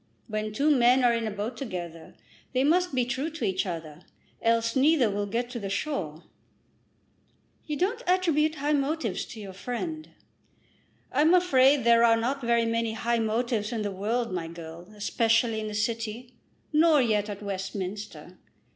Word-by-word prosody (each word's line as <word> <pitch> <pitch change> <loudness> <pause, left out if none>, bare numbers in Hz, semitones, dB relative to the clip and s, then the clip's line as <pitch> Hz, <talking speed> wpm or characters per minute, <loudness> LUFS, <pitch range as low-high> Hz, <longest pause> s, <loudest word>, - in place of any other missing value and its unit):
When 215 -1 -3
two 285 +8 +2
men 250 +1 +4
are 240 -1 +5
in 230 -1 -1
a - - -1
boat 210 +4 -4
together 175 -9 -7 0.4
they 255 +1 +2
must 350 +1 +2
be 250 -1 +2
true 265 +6 -2
to 315 -7 -4
each 190 0 0
other, 165 -2 -6 0.4
else 230 0 +1
neither 270 -4 +4
will 205 0 -2
get 235 +4 -2
to 240 - -4
the 200 -2 -5
shore." 185 - -3 1.4
"You 300 - -2
don't 420 - 0
attribute 325 -4 +2
high 295 +1 0
motives 275 - -1
to 225 - -10
your 195 -2 -8
friend." 310 - -5 1.0
"I'm 305 +6 +4
afraid 275 -6 +4
there 235 0 +5
are 230 -1 +5
not 260 +5 -1
very 235 -1 +2
many 230 0 -1
high 235 +1 0
motives 225 0 -1
in 225 -3 -2
the 205 - -2
world, 220 +3 -2
my 170 -3 -3
girl, 170 +2 -10
especially 225 +2 +1
in 215 - -4
the 210 - -5
city; 230 +2 -3 0.4
nor 310 0 +5
yet 215 -4 +1
at 205 0 -6
Westminster. 195 +1 -6
230 Hz, 165 wpm, -27 LUFS, 205-275 Hz, 1.4 s, are